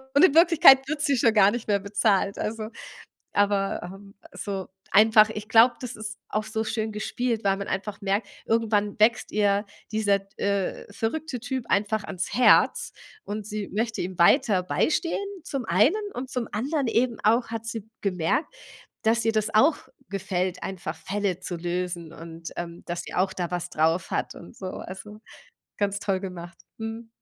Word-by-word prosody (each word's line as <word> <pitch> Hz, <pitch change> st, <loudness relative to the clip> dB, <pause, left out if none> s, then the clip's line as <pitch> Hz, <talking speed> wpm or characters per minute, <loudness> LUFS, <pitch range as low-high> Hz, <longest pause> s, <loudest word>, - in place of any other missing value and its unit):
und 295 Hz, -, +8 dB
in 300 Hz, -, +3 dB
Wirklichkeit 330 Hz, -5 st, +8 dB
wird 305 Hz, -1 st, -2 dB
sie 285 Hz, -2 st, +2 dB
schon 230 Hz, -1 st, +3 dB
gar 200 Hz, -1 st, +6 dB
nicht 240 Hz, -1 st, -5 dB
mehr 200 Hz, -1 st, +2 dB
bezahlt. 200 Hz, 0 st, +1 dB
Also 215 Hz, 0 st, -3 dB, 0.7 s
aber, 200 Hz, -1 st, +1 dB
ähm, 195 Hz, +2 st, -11 dB, 0.2 s
so 195 Hz, -2 st, -5 dB, 0.2 s
einfach 215 Hz, +1 st, +6 dB
ich 210 Hz, -1 st, -6 dB
glaube, 235 Hz, +2 st, +6 dB
das 250 Hz, -1 st, -6 dB
ist 215 Hz, 0 st, -6 dB
auch 215 Hz, 0 st, -1 dB
so 220 Hz, 0 st, -2 dB
schön 220 Hz, -1 st, -2 dB
gespielt, 225 Hz, +1 st, -2 dB
weil 195 Hz, 0 st, +3 dB
man 200 Hz, -, -5 dB
einfach 200 Hz, +2 st, -4 dB
merkt 200 Hz, +3 st, 0 dB, 0.2 s
irgendwann 210 Hz, -3 st, 0 dB
wächst 230 Hz, +3 st, +3 dB
ihr 205 Hz, 0 st, +2 dB, 0.3 s
dieser 205 Hz, -2 st, +2 dB
d 195 Hz, 0 st, -26 dB
äh, 200 Hz, 0 st, -1 dB
verrückte 260 Hz, +4 st, -3 dB
Typ 250 Hz, 0 st, -3 dB
einfach 210 Hz, +1 st, +1 dB
ans 180 Hz, -1 st, -4 dB
Herz 250 Hz, -, +4 dB, 0.3 s
und 210 Hz, 0 st, -5 dB
sie 210 Hz, -1 st, -4 dB
möchte 225 Hz, 0 st, -2 dB
ihm 185 Hz, 0 st, -6 dB
weiter 190 Hz, +2 st, +4 dB
beistehen 315 Hz, -, 0 dB, 0.3 s
zum 275 Hz, -7 st, -4 dB
einen 240 Hz, -, +3 dB
und 255 Hz, +2 st, -5 dB
zum 245 Hz, -3 st, -2 dB
anderen 270 Hz, +4 st, -1 dB
eben 235 Hz, -1 st, +1 dB
auch 230 Hz, +2 st, +3 dB
hat 225 Hz, 0 st, -5 dB
sie 225 Hz, -2 st, -5 dB
gemerkt, 190 Hz, -, 0 dB, 0.5 s
dass 230 Hz, +1 st, +2 dB
ihr 225 Hz, -, +2 dB
das 215 Hz, 0 st, -1 dB
auch 285 Hz, +9 st, +5 dB, 0.3 s
gefällt 185 Hz, -2 st, -2 dB
einfach 190 Hz, -2 st, -5 dB
Fälle 195 Hz, -2 st, -2 dB
zu 180 Hz, -1 st, -5 dB
lösen 175 Hz, -1 st, -3 dB
und, 165 Hz, 0 st, -9 dB
ähm, 170 Hz, 0 st, -6 dB
dass 175 Hz, 0 st, -3 dB
sie -, -, -9 dB
auch 190 Hz, +1 st, +1 dB
da 175 Hz, -2 st, -3 dB
was 175 Hz, 0 st, -3 dB
drauf 160 Hz, +3 st, +1 dB
hat -, -, -2 dB
und 170 Hz, -, -12 dB
so, 190 Hz, -, -7 dB
also, 210 Hz, +3 st, -9 dB, 0.6 s
ganz 200 Hz, -1 st, 0 dB
toll 195 Hz, -2 st, -1 dB
gemacht. 175 Hz, -3 st, -8 dB, 0.2 s
Mhm. 225 Hz, +1 st, -6 dB
210 Hz, 175 wpm, -26 LUFS, 190-225 Hz, 0.7 s, und